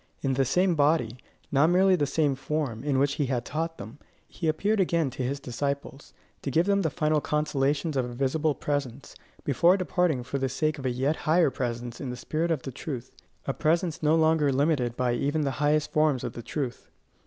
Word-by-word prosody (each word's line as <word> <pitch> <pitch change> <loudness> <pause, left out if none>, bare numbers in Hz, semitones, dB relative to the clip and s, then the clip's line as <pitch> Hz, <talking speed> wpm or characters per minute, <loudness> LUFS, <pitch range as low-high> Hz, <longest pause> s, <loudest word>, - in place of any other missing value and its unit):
In 135 -1 +1
the 135 +1 +2
same 180 +7 +2
body 145 -6 +2 0.3
not 145 +3 +4
merely 185 +1 +5
the 145 -5 0
same 150 -1 +1
form, 135 -3 -3
in 140 -2 +1
which 140 +1 +2
he 140 - +1
had 125 -2 -1
taught 165 +2 -3
them, 110 +8 -10 0.3
he 165 - -4
appeared 200 +7 +1
again 170 -6 +1
to 130 - -6
his 135 +3 -2
disciples, 140 +2 -4 0.3
to - - -3
give 160 +6 +2
them 200 0 +2
the 160 - +1
final 155 0 +1
consolations 150 0 0
of 130 -2 +1
a 120 0 -7
visible 145 +3 0
presence, 140 -2 -3 0.3
before 170 +7 +4
departing 175 -6 0
for 140 +3 -3
the 135 0 0
sake 155 +3 -1
of 135 - -3
a - - +2
yet 135 +5 0
higher 165 -3 +4
presence 120 -1 -4
in 135 - -4
the 125 - -5
spirit 160 +6 -2
of 155 -6 -1
truth, 130 -2 -6 0.3
a 135 - -1
presence 165 +2 0
no 155 +1 +3
longer 160 -3 +3
limited 135 -4 +1
by 125 -1 +1
even 145 +6 0
the 140 -2 0
highest 150 +1 +2
forms 150 -4 +2
of - - -4
the 120 - -7
truth. 125 +1 -5
145 Hz, 205 wpm, -27 LUFS, 130-160 Hz, 0.3 s, merely